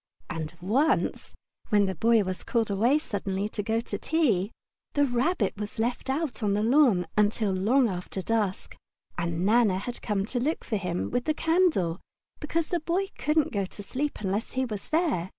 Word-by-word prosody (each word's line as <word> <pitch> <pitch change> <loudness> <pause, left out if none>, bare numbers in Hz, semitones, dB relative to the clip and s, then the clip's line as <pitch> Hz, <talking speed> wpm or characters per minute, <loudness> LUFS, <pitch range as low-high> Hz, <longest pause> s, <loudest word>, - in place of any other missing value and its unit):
And 160 0 -5
once, 255 - +1 0.4
when 205 -3 +4
the 190 - -1
Boy 225 +5 +3
was 185 -1 -4
called 225 -3 0
away 235 +9 +3
suddenly 200 -7 -2
to 215 - -3
go 220 +2 -1
out 230 - -2
to - - -4
tea, 230 - +1 0.5
the 285 0 +4
Rabbit 245 - 0
was 210 0 -5
left 240 +4 -1
out 285 -1 -1
on 205 -2 +1
the 210 - +1
lawn 235 -7 +4
until 210 0 +2
long 230 +8 +3
after 185 0 -4
dusk, 210 -3 -1 0.4
and 170 +1 -1
Nana 215 -3 +4
had 240 +6 -4
to - - -12
come 210 -3 -1
and 210 +6 -6
look 305 +6 -1
for 220 - -1
him 180 -2 -3
with 245 0 -1
the 310 - +1
candle 320 - +2 0.4
because 320 +1 -1
the 350 - 0
Boy 355 +5 -1
couldn't 305 0 +2
go 200 -2 0
to 205 +2 -10
sleep 270 +5 -3
unless 200 +2 -2
he 260 0 0
was 210 -5 -6
there. 310 - +1
220 Hz, 190 wpm, -27 LUFS, 195-275 Hz, 0.5 s, when